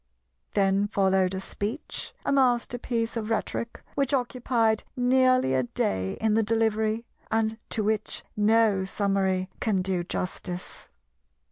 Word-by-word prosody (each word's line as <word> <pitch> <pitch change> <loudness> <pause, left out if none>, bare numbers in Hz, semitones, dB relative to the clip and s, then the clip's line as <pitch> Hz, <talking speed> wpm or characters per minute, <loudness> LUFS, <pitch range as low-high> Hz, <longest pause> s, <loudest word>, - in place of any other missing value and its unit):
Then 195 0 +3
followed 190 -2 +2
a - - -2
speech, 210 +8 -5
a - - +1
masterpiece 245 -3 +1
of 225 -1 -3
rhetoric, 230 +1 -2
which 275 0 +1
occupied 240 -3 +1 0.2
nearly 255 - +4
a 130 - +3
day 95 -6 -1
in 220 -1 0
the 225 - +4
delivery, 220 0 +1 0.2
and 220 0 0
to 215 - -1
which 215 0 -1
no 210 -2 +3
summary 190 -1 0
can 200 -5 +1
do 185 -2 0
justice. 180 0 -5
220 Hz, 125 wpm, -27 LUFS, 190-230 Hz, 0.2 s, nearly